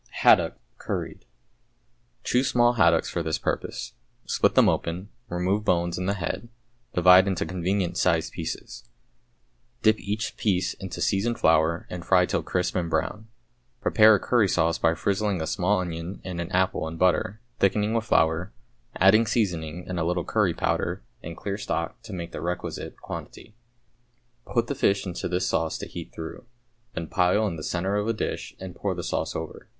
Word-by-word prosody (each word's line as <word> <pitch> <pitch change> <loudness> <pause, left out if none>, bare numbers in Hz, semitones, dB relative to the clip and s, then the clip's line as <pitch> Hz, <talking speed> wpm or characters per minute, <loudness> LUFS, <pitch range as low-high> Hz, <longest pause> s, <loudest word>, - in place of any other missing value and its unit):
=Haddock, - - +5 0.2
Curried.= - - -4 1.0
Choose 125 +2 +2
small 120 0 +4
haddocks 85 -7 +4
for 85 - -2
this 80 -1 -1
purpose. - - -3 0.3
Split - - +2
them - - +6
open, 90 +4 -1 0.2
remove 90 +4 0
bones 85 -3 +1
and 90 +1 -2
the 100 - +1
head, 100 +6 -4 0.5
divide 90 +2 +7
into 95 0 0
convenient 90 0 -1
sized 85 -2 +1
pieces. 80 -2 -6 0.9
Dip 110 0 +4
each 105 +3 -3
piece 95 -4 +1
into 95 -1 -7
seasoned 115 +5 +1
flour 80 +1 +3
and 90 -1 -6
fry 90 -1 +4
till - - -1
crisp 90 0 -1
and 85 -2 -1
brown. 105 +7 -2 0.5
Prepare 110 -3 +6
a - - 0
curry 120 -2 +3
sauce 85 -2 +1
by 80 0 +3
frizzling 100 +1 0
a 80 - -2
small 95 +2 +1
onion 85 +1 -5
and 90 -2 -4
an 85 +2 -6
apple 95 -3 +1
in 80 +1 -6
butter, 90 +4 +1 0.2
thickening 105 +2 +2
with 115 -1 0
flour, 80 -2 +2 0.4
adding 110 +5 +5
seasoning 90 -6 -1
and 90 -1 -3
a - - +1
little 90 +1 -1
curry - - +1
powder - - -1 0.2
and 85 +1 -8
clear 100 0 -4
stock - - -3
to - - -11
make 85 -2 -5
the - - -6
requisite 90 +1 -4
quantity. 110 - -8 1.0
Put 120 -2 +2
the 130 - -2
fish 100 -7 +1
into 90 -2 -3
this 90 +1 0
sauce 80 -1 0
to - - -6
heat - - -8
through, 80 +8 -8 0.5
then 85 - -3
pile 90 +5 +2
in 100 - -2
the 80 - -7
centre 95 +5 -1
of 105 +1 -1
a 115 - +2
dish 110 - -4
and 95 -1 -7
pour 95 +1 -2
the 85 - -5
sauce - - -2
over. - - -6
90 Hz, 175 wpm, -26 LUFS, 85-105 Hz, 1.0 s, divide